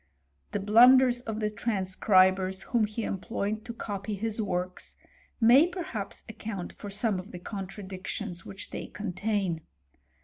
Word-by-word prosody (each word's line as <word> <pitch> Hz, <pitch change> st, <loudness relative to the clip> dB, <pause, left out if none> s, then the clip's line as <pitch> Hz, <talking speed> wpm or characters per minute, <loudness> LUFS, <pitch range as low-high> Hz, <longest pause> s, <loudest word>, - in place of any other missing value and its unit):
The -, -, -1 dB
blunders 245 Hz, +4 st, +6 dB
of 220 Hz, -3 st, -4 dB
the 210 Hz, 0 st, 0 dB
transcribers 190 Hz, -2 st, +2 dB
whom 235 Hz, -3 st, +2 dB
he 215 Hz, +2 st, -4 dB
employed 210 Hz, +2 st, -3 dB
to 240 Hz, -, -5 dB
copy 205 Hz, -1 st, -4 dB
his 220 Hz, +2 st, -2 dB
works, 185 Hz, -3 st, -3 dB, 0.4 s
may 250 Hz, +7 st, +7 dB
perhaps 340 Hz, -, -5 dB
account 210 Hz, -5 st, -6 dB
for 205 Hz, -, -8 dB
some 205 Hz, -1 st, 0 dB
of 185 Hz, +3 st, -9 dB
the 180 Hz, -, -7 dB
contradictions 190 Hz, -1 st, -6 dB
which 195 Hz, -, -8 dB
they -, -, -5 dB
contain. 200 Hz, -3 st, -2 dB
205 Hz, 135 wpm, -29 LUFS, 190-225 Hz, 0.4 s, may